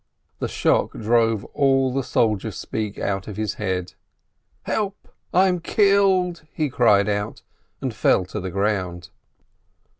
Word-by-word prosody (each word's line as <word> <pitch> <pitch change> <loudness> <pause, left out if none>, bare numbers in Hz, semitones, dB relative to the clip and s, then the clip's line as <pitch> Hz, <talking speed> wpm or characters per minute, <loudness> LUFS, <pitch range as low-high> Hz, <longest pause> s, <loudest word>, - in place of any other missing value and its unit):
The - - -1
shock - - +1
drove 115 -1 +1
all 135 -2 +2
the 135 - 0
soldier 110 -5 0
speech 105 -2 -4
out 95 -1 -2
of 105 -2 -7
his 110 -2 -1
head. 95 -3 -2 0.7
"Help, 205 -2 -3 0.2
I 185 +2 +4
am 180 -1 +1
killed!" 190 -2 +2
he 150 -3 -2
called 105 -5 +4
out, 105 0 -2 0.4
and 130 -3 -2
fell 95 -3 +2
to 100 +4 -5
the 95 -1 -4
ground. 95 -3 -2
110 Hz, 140 wpm, -23 LUFS, 100-150 Hz, 0.7 s, I